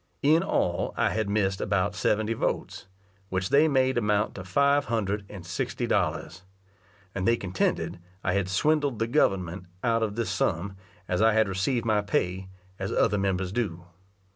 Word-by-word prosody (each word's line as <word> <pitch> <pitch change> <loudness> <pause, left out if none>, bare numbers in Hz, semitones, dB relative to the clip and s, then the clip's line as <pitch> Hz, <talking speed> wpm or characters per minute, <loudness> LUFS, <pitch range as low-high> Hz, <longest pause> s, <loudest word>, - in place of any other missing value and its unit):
In 155 +4 +5
all 90 - 0
I - - +2
had 110 -2 -1
missed 100 -2 0
about - - 0
seventy 110 +1 +1
votes, 110 - -3 0.4
which 95 0 -1
they 150 +3 +5
made 130 -3 +2
amount 105 -2 +1
to 95 - -7
five 140 +9 +2
hundred 105 -3 -2
and 95 -4 -9
sixty 85 - -3
dollars; - - -1 0.7
and 95 -1 -2
they 115 0 +4
contended 95 -3 -1 0.2
I 90 - +1
had 100 -1 0
swindled 145 - +1
the 115 - 0
government 95 - 0 0.2
out 115 -1 +2
of 105 -2 -1
this 115 0 -1
sum, 95 +2 -1 0.3
as 90 +2 0
I 110 0 +5
had 110 -1 +3
received 100 +6 -1
my 110 -2 +2
pay, 95 -2 -1 0.3
as 95 0 -3
other 105 0 +2
members 95 -1 -1
do. 95 -7 -3
105 Hz, 165 wpm, -27 LUFS, 95-115 Hz, 0.7 s, In